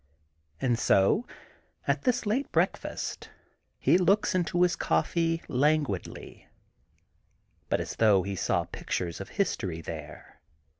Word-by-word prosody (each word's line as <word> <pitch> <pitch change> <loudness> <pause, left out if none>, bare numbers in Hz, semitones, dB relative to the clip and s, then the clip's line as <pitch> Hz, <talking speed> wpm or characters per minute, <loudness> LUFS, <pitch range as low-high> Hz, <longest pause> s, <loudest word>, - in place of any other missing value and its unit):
And 120 +1 +1
so, 100 - +3 0.6
at - - 0
this 250 -2 +1
late 240 +7 -1
breakfast, - - -1 0.5
he 180 - +4
looks 200 +4 +3
into 175 -1 +1
his 180 - +2
coflfee 165 -1 0
languidly, 145 - -1 1.2
but - - +1
as - - -4
though 105 -4 +4
he 100 +1 -4
saw - - 0
pictures 85 0 -4
of 95 - -8
history 95 - -1
there. 80 -2 -9
150 Hz, 115 wpm, -28 LUFS, -, 1.2 s, he